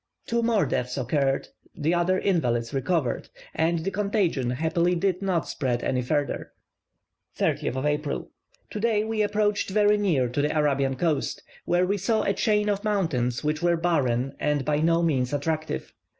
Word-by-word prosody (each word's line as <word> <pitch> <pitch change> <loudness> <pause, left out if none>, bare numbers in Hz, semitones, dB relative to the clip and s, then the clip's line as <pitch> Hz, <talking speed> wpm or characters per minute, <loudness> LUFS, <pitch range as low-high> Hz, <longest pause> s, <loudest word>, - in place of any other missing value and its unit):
Two 235 0 0
more 230 -6 +2
deaths 125 -1 -2
occurred, 135 +1 0 0.3
the 160 +4 0
other 175 +2 +2
invalids 120 -13 0
recovered, 135 -1 -1 0.2
and 165 0 0
the 195 - 0
contagion 195 - 0
happily 165 +7 +1
did 185 +1 0
not 185 -4 0
spread 125 -4 -2
any 125 - 0
further. 145 +3 -2 0.8
30th 130 +2 0
April. 150 0 -2 0.4
Today 215 -1 +1
we 220 0 -1
approached 210 0 +1
very 210 +1 +4
near 165 -12 +2
to 125 +4 -1
the 150 +2 0
Arabian 140 -3 +1
coast, 150 -1 -1 0.2
where 175 +1 +2
we 200 +2 0
saw 220 +4 +1
a 200 - +1
chain 210 -1 +1
of 205 -1 0
mountains 160 - 0
which 150 +1 -1
were 175 -1 +2
barren 135 -7 0
and 150 -2 0
by 150 0 +1
no 165 +2 +2
means 135 -5 +1
attractive. 155 +2 -2
160 Hz, 160 wpm, -26 LUFS, 135-195 Hz, 0.8 s, very